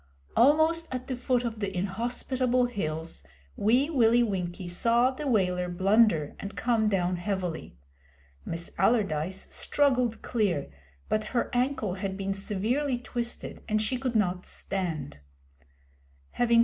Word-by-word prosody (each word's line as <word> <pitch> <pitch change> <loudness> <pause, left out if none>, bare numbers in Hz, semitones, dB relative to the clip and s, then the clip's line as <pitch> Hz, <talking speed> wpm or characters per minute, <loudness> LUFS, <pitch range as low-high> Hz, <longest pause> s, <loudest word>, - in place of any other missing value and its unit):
Almost 315 +6 +4
at 255 0 -4
the 260 - -3
foot 250 0 0
of 230 -2 -3
the 195 -3 -3
inhospitable 245 +6 0
hills, 160 - -3 0.3
Wee 245 +7 +3
Willie 240 -6 +4
Winkie 185 -4 -3
saw 235 +8 +3
the 290 +2 -5
Waler 180 -6 +1
blunder 190 -3 +3
and 200 - -6
come 225 -3 +2
down 180 -2 +1
heavily. 175 - -3 0.7
Miss 165 0 -5
Allardyce 190 -5 +1
struggled 255 -5 +1
clear, 195 - 0 0.4
but 215 0 0
her - - 0
ankle 245 -6 0
had 190 -1 -2
been 195 0 -1
severely 225 +8 -1
twisted, 240 -1 -5
and 215 0 +2
she 230 +4 0
could 255 -2 -2
not 180 -4 +1
stand. 170 - -3
215 Hz, 125 wpm, -28 LUFS, 185-245 Hz, 0.7 s, Almost